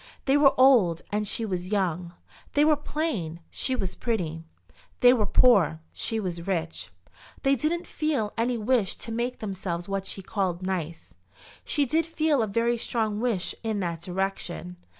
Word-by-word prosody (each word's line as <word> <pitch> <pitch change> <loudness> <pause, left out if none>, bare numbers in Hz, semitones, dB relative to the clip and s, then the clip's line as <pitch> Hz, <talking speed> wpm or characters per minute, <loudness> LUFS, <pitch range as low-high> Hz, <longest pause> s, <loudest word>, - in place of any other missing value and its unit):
They 270 - +3
were 290 -1 +5
old 225 -11 +5
and 210 0 0
she 225 - +1
was 185 -2 -4
young. 180 -4 -1 0.4
They 295 +1 +4
were 310 -1 +5
plain; 285 - -3
she 260 - +1
was 190 -6 -2
pretty. 170 -9 -2 0.6
They 245 -1 +8
were 215 -5 +1
poor; 195 -10 +4
she 225 - -1
was 175 -4 -4
rich. 165 -4 -2 0.5
They 275 0 +4
didn't 330 +7 -1
feel 290 -9 -1
any 240 +1 0
wish 220 -3 +1
to 230 - -7
make 240 +2 -2
themselves 190 -4 -4
what 195 -1 -2
she 195 - -4
called 185 -2 -2
"nice." 170 - -4 0.5
She 290 - +1
did 320 +5 +1
feel 310 -4 +1
a 220 - 0
very 230 +3 +1
strong 220 -3 -1
wish 225 -6 0
in 220 -3 -2
that 170 -2 -3
direction. 180 -1 -3
210 Hz, 165 wpm, -26 LUFS, 180-250 Hz, 0.6 s, They